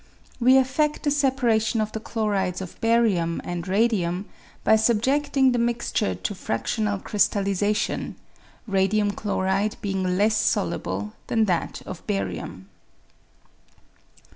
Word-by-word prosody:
We 255 +2 +5
effed 265 +3 +2
the 290 - +1
separation 250 -6 +1
of 215 0 -1
the 220 - -4
chlorides 205 -5 -1
of 185 -2 -9
barium 220 -8 +2
and 175 0 -5
radium 195 -3 +1 0.4
by 220 - +5
subjeding 265 +5 +2
the 245 - 0
mixture 235 - 0
to 150 - -4
fractional 205 - -2
crystallisation, 200 0 0 0.5
radium 205 0 +1
chloride 200 +1 -1
bemg 190 -2 -1
less 210 +2 +3
soluble 105 - -1
than 225 -1 +2
that 180 -4 -2
of - - -7
barium. 95 -1 -4
210 Hz, 115 wpm, -24 LUFS, 190-235 Hz, 0.5 s, We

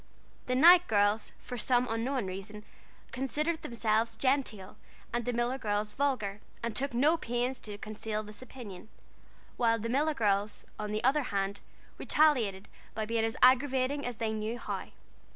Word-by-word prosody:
The 255 - +1
Knight 345 +6 +8
girls 205 +1 +2
for 245 - -7
some 245 +3 +3
unknown 230 +1 -1
reason, 195 +3 -7 0.5
considered 300 +5 -1
themselves 225 -1 0
genteel 255 -8 -1 0.4
and 240 -1 -1
the 245 - 0
Miller 240 +2 -1
girls 210 -2 -1
vulgar, 215 -8 -1 0.2
and 235 -2 -3
took 275 -1 -1
no 300 +7 +4
pains 245 -1 -2
to 205 -2 -7
conceal 215 0 -4
this 210 +1 -9
opinion; 220 -6 -10 0.7
while 230 -2 +3
the 230 +1 -4
Miller 295 +5 +1
girls, 205 -2 0
on 210 0 -3
the 215 0 -2
other 275 +4 +3
hand, 200 0 -2 0.4
retaliated 230 -11 +2 0.3
by 220 0 -2
being 225 +1 0
as 225 +2 -1
aggravating 260 +2 +4
as 245 -2 -4
they 220 -1 -1
knew 220 +2 -3
how. - - -5
230 Hz, 155 wpm, -30 LUFS, 210-260 Hz, 0.7 s, Knight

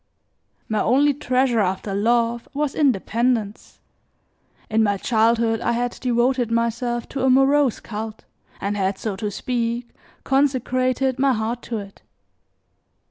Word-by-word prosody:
My 215 -1 0
only 280 +5 +3
treasure 255 -3 +1
after 190 0 -1
love, 235 +3 +1
was 295 -1 -1
independence. 235 -4 0 0.9
In 220 +1 +1
my 205 -2 +2
childhood 225 +1 +2
I 235 - 0
had 245 +1 -1
devoted 245 0 +1
myself 235 +1 -1
to 270 -1 -3
a 265 - +4
morose 270 0 +3
cult, 220 0 -7 0.3
and 200 +1 -2
had, 195 -1 -1
so 210 -1 -3
to 210 +1 -2
speak, 235 +2 -2 0.3
consecrated 260 -1 +1
my 275 -1 +3
heart 230 +2 -2
to 230 - -2
it. 200 -1 -9
235 Hz, 130 wpm, -22 LUFS, 220-255 Hz, 0.9 s, a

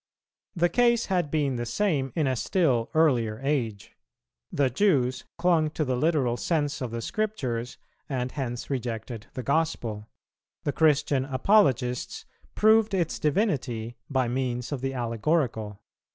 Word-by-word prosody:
The 175 0 +3
case 235 +5 +3
had 175 -5 +1
been 145 -5 0
the 120 - -3
same 145 - 0
in 155 - +1
a 130 -1 +1
still 130 -5 +1
earlier 120 -9 +2
age; 120 -8 -2 0.6
the 140 -1 +2
Jews 130 - +1
clung 170 -3 +3
to 155 - +1
the 130 -1 0
literal 135 -4 +1
sense 150 -2 -1
of 125 - -2
the 115 0 -5
Scriptures 130 - -2 0.3
and 130 -2 -2
hence 125 -4 -4
rejected 115 -3 -4
the 130 - -4
Gospel; 120 -8 -1 0.5
the 145 - 0
Christian 150 -3 +3
Apologists 130 - +1 0.3
proved 220 -1 +4
its 175 -4 -1
divinity 135 - 0
by 130 -3 +1
means 125 0 -2
of 140 -4 -3
the 135 0 -2
allegorical. 115 -3 -1
135 Hz, 135 wpm, -27 LUFS, 120-160 Hz, 0.6 s, proved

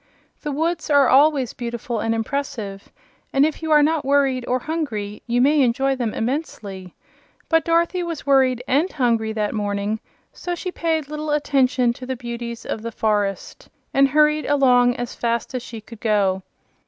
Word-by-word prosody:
The 295 - -3
woods 325 +4 -1
are 285 -3 +5
always 275 -1 +4
beautiful 235 -1 -4
and 225 +1 0
impressive, 225 -5 -4 0.4
and 275 +1 +4
if 310 0 -3
you 320 -1 -3
are 300 -1 +6
not 315 0 +1
worried 275 -2 +2
or 250 - +1
hungry 240 -9 -4
you 240 +1 +2
may 290 +3 +4
enjoy 265 +2 +2
them 240 -4 -2
immensely; 210 - -4 0.5
but 325 -1 +3
Dorothy 340 +2 +2
was 335 -5 -5
worried 260 -3 +3
and 300 +8 +2
hungry 230 -5 +1
that 210 -1 -1
morning, 205 0 -2 0.3
so 355 -1 -4
she 365 +1 -5
paid 320 -4 -1
little 300 +1 -5
attention 265 -4 +2
to 255 +1 -10
the 260 - -2
beauties 235 -1 -6
of 220 - -4
the 230 +1 -5
forest, 205 -3 -2 0.2
and 275 0 +5
hurried 300 +2 +3
along 250 -4 +4
as 245 -1 -5
fast 235 +1 -2
as 255 - -2
she 230 -2 -8
could 220 +1 -13
go. 200 -4 +1
255 Hz, 170 wpm, -22 LUFS, 225-295 Hz, 0.5 s, are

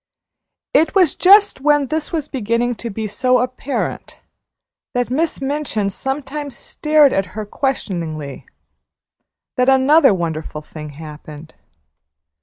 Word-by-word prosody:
It 315 +3 +3
was 365 -6 +4
just 400 -4 +5
when 295 0 +3
this 310 +3 -3
was 310 -3 -2
beginning 240 -1 -1
to 235 - -4
be 220 +1 -4
so 250 +4 +1
apparent 255 +2 -3 0.8
that 245 0 0
Miss 315 +5 0
Minchin 270 -8 -2
sometimes 275 +3 -5
stared 300 -2 +3
at 195 -1 0
her 215 - -3
questioningly, 170 - -4 1.1
that 250 +1 +3
another 270 +2 +5
wonderful 160 -4 -3
thing 150 -1 -9
happened. 155 +1 -11
255 Hz, 115 wpm, -19 LUFS, 195-295 Hz, 1.1 s, just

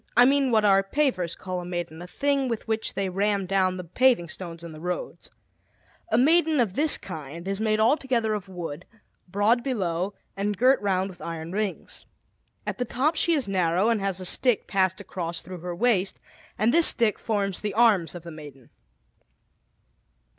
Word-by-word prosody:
I 245 - +8
mean 275 0 +3
what 220 -3 +3
our 195 -1 +5
pavers 195 - -1
call 185 -1 -4
a - - -8
maiden, 175 -2 -5
a 175 - -8
thing 280 +5 0
with 230 -3 -4
which 220 0 -2
they 195 -1 -1
ram 200 +1 0
down 185 -1 +1
the 180 - -5
paving 180 0 +2
stones 170 -1 -7
in 170 - -8
the 155 - -10
roads. 180 +1 -5 0.8
A 220 - +3
maiden 315 +3 +4
of 220 -7 +1
this 300 +6 +3
kind 160 +4 -8
is 195 +1 -2
made 215 -1 +1
altogether 235 -2 +2
of 200 -3 -5
wood, 175 -3 -6 0.4
broad 205 +6 +2
below, 190 -7 -2 0.2
and 205 0 -2
girt 255 +4 +4
round 190 -1 0
with 175 - -16
iron 165 0 -6
rings. 205 0 -4 0.6
At - - -4
the - - +1
top 275 +8 0
she 335 +2 +2
is 280 -8 0
narrow, 185 +1 +2
and 225 -3 +1
has 195 -2 -1
a 185 - -5
stick 245 +4 +1
passed 190 -1 +1
across 175 -4 -5
through 185 -1 -9
her 175 +1 -5
waist, 200 -3 +1 0.4
and 220 +4 +2
this 335 -1 +5
stick 230 -4 +3
forms 200 -4 -1
the 205 -2 -3
arms 215 -8 +3
of 175 - -8
the 170 - -8
maiden. 145 -5 -12
195 Hz, 185 wpm, -26 LUFS, 180-235 Hz, 0.8 s, I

